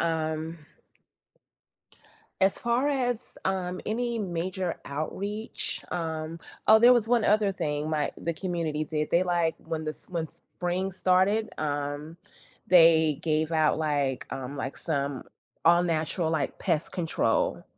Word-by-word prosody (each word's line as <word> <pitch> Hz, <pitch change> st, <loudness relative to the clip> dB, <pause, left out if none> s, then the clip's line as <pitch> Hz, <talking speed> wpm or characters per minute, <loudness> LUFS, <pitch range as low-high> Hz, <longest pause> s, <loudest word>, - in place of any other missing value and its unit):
um 160 Hz, 0 st, -1 dB, 1.8 s
as 190 Hz, 0 st, +3 dB
far 240 Hz, +3 st, +1 dB
as, 250 Hz, -4 st, 0 dB, 0.2 s
um, 185 Hz, -1 st, -1 dB
any 235 Hz, +1 st, -1 dB
major 185 Hz, -2 st, -2 dB
outreach, 200 Hz, +9 st, -4 dB
um 160 Hz, -1 st, -3 dB, 0.3 s
Oh, 220 Hz, -, +8 dB
there 240 Hz, +2 st, +8 dB
was 230 Hz, -3 st, +2 dB
1 240 Hz, -2 st, +3 dB
other 210 Hz, -1 st, +3 dB
thing 150 Hz, -5 st, -2 dB
my 150 Hz, -2 st, 0 dB
the 170 Hz, -, -2 dB
community 165 Hz, -3 st, -2 dB
did. 150 Hz, -1 st, -2 dB
They, 170 Hz, -, +4 dB
like, 175 Hz, -3 st, +1 dB
when 160 Hz, -1 st, -5 dB
this 155 Hz, 0 st, -5 dB
when 165 Hz, -3 st, -2 dB
spring 180 Hz, +3 st, -4 dB
started, 190 Hz, +4 st, +2 dB
um, 145 Hz, +2 st, -3 dB, 0.5 s
they 160 Hz, -4 st, +6 dB
gave 155 Hz, 0 st, 0 dB
out, 155 Hz, -1 st, +3 dB
like, 145 Hz, -4 st, 0 dB
um, 135 Hz, +2 st, -5 dB
like, 135 Hz, -1 st, -4 dB
some 140 Hz, -4 st, -2 dB, 0.4 s
all-natural, 170 Hz, -1 st, +2 dB
like, 155 Hz, -4 st, -1 dB
pest 165 Hz, -4 st, 0 dB
control 195 Hz, -, 0 dB
165 Hz, 130 wpm, -27 LUFS, 155-190 Hz, 1.8 s, Oh